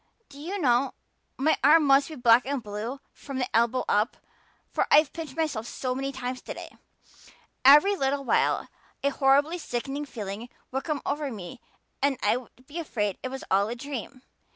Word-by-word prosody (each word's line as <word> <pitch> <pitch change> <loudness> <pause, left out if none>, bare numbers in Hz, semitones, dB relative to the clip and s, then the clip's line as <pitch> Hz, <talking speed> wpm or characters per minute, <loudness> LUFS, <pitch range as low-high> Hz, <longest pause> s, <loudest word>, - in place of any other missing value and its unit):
Do 280 0 -13
you 355 +7 -4
know, 255 -3 +2 0.4
my 300 +4 +2
arm 310 +3 +7
must 275 +1 +4
be 315 - -7
black 240 -2 +5
and 275 -3 -2
blue 220 +6 -5
from 275 -2 -7
the 250 -1 -2
elbow 235 +2 +2
up, 210 +4 +1 0.5
for - - 0
I've 295 -1 +5
pinched 320 -4 -7
myself 280 -9 -1
so 255 0 -3
many 270 +1 -3
times 255 -1 -5
today. - - -8 0.9
Every 295 +10 +7
little 275 -4 0
while 260 - +1 0.4
a 280 - +3
horrible 280 +5 +3
sickening 275 +1 -4
feeling 215 -2 -6 0.2
would 265 +1 -3
come 305 -3 -2
over 290 0 -1
me 215 +3 -8 0.4
and 280 -1 +2
I'd 245 -1 +1 0.2
be 295 +5 -9
so - - -1
afraid 210 - -2
it 255 - -4
was 265 +1 -6
all 200 +2 +3
a 235 - -3
dream. 260 0 -7
270 Hz, 175 wpm, -27 LUFS, 240-285 Hz, 0.9 s, arm